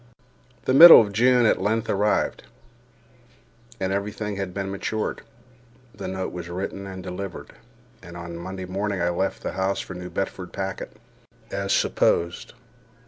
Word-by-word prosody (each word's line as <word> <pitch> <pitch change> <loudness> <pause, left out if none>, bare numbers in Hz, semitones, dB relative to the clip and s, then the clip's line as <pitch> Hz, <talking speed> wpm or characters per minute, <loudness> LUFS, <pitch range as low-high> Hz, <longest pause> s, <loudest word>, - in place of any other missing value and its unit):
The 130 - +1
middle 165 +5 +11
of 105 -3 0
June 125 +2 +4
at 110 - +2
length 110 +3 0
arrived, 105 +1 0 1.4
and 95 0 -1
every 100 +1 -2
thing 105 -1 -5
had 95 -2 -4
been 95 +1 -4
matured. 110 +2 -3 0.7
The - - -7
note 95 0 -4
was 85 -1 -7
written 95 +2 -5
and 95 -1 -8
delivered, 90 0 -7 0.5
and 85 -1 -11
on 85 0 -7
a 85 - -7
Monday 95 +1 -6
morning 100 +1 -3
I 85 0 +1
left 95 +3 -2
the - - -3
house 95 +1 -1
for - - -6
the 90 - -8
New 90 0 -7
Bedford 95 -1 -5
packet, 95 -1 -5 0.5
as 100 0 -2
supposed. 85 +1 +1
95 Hz, 160 wpm, -24 LUFS, 90-100 Hz, 1.4 s, middle